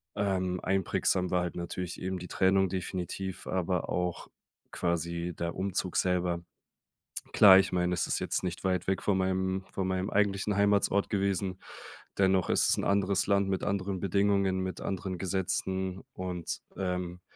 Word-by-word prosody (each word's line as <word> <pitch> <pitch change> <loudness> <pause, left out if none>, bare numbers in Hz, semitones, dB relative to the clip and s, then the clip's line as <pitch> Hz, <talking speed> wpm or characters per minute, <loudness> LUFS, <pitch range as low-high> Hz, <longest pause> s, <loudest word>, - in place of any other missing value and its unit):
Ähm, 95 -3 0
einprägsam 95 -1 +1
war 90 -1 +2
halt 90 -2 -3
natürlich 85 0 -5
eben 95 0 -3
die 90 - -7
Trennung 95 0 +3
definitiv, 95 0 -4
aber 90 -1 -1
auch 90 -1 -2 0.4
quasi 85 0 -2
der 85 0 -3
Umzug 95 -1 -2
selber. 90 -2 +1 0.9
Klar, 95 -2 +9
ich 95 - +1
meine, 90 0 +1
das 90 -1 0
ist - - 0
jetzt - - -1
nicht 90 -1 -3
weit 90 -2 0
weg 95 0 0
von 95 -2 +2
meinem 95 0 0
von 95 -1 -2
meinem 95 +1 -1
eigentlichen 100 0 +1
Heimatsort 100 0 +2
gewesen, 95 -2 0 0.6
dennoch 95 -1 +3
ist - - +3
es - - +4
'n - - -1
anderes 100 -2 +2
Land 100 -1 +2
mit 95 -1 -1
anderen 100 -1 -1
Bedingungen, 100 -1 +2
mit 95 0 -4
anderen 95 -1 -3
Gesetzen 95 0 -2
und, 90 -2 -4 0.2
ähm, 90 -1 -3
95 Hz, 155 wpm, -30 LUFS, 90-95 Hz, 0.9 s, Klar